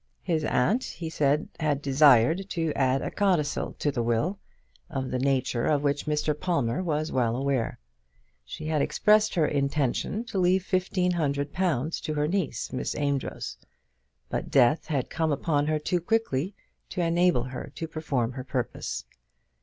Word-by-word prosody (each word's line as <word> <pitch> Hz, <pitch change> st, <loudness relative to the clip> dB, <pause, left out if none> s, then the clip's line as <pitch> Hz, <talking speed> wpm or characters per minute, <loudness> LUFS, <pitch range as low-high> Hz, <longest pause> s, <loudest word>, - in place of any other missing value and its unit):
His 160 Hz, -2 st, 0 dB
aunt, 195 Hz, -, +2 dB
he 165 Hz, -1 st, -6 dB
said, 150 Hz, 0 st, +1 dB
had 150 Hz, -3 st, +1 dB
desired 145 Hz, -, +4 dB
to 165 Hz, -4 st, -1 dB
add 135 Hz, 0 st, +1 dB
a -, -, -3 dB
codicil 175 Hz, -8 st, 0 dB
to 145 Hz, -, 0 dB
the 125 Hz, -, -1 dB
will, 120 Hz, -, 0 dB, 0.5 s
of 130 Hz, -1 st, -3 dB
the 130 Hz, -, -1 dB
nature 130 Hz, -3 st, +1 dB
of 145 Hz, -2 st, +2 dB
which 145 Hz, +1 st, 0 dB
Mr. 150 Hz, 0 st, +1 dB
Palmer 150 Hz, -4 st, -1 dB
was 155 Hz, -3 st, -1 dB
well 120 Hz, -3 st, +1 dB
aware. 135 Hz, -2 st, -1 dB, 0.7 s
She 105 Hz, -, -8 dB
had 155 Hz, -2 st, +1 dB
expressed 215 Hz, +5 st, +3 dB
her 165 Hz, -3 st, +3 dB
intention 145 Hz, -, 0 dB
to 220 Hz, -5 st, -3 dB
leave 185 Hz, +1 st, +3 dB
fifteen 185 Hz, -1 st, +1 dB
hundred 145 Hz, -4 st, -1 dB
pounds 165 Hz, -5 st, 0 dB
to 155 Hz, -1 st, -3 dB
her 150 Hz, 0 st, +1 dB
niece, 165 Hz, -, -2 dB
Miss 130 Hz, -, -2 dB
Amedroz; 140 Hz, -2 st, -2 dB, 0.7 s
but -, -, -3 dB
death 135 Hz, +3 st, +4 dB
had 140 Hz, -7 st, -2 dB
come 160 Hz, -1 st, 0 dB
upon 145 Hz, 0 st, +1 dB
her 155 Hz, 0 st, +2 dB
too 175 Hz, +3 st, -1 dB
quickly 190 Hz, -4 st, 0 dB, 0.3 s
to 180 Hz, -, -2 dB
enable 170 Hz, -5 st, +3 dB
her 130 Hz, +1 st, -7 dB
to 165 Hz, -, -4 dB
perform 140 Hz, -7 st, -1 dB
her 130 Hz, 0 st, -6 dB
purpose. 125 Hz, -2 st, -3 dB
150 Hz, 160 wpm, -27 LUFS, 135-170 Hz, 0.7 s, desired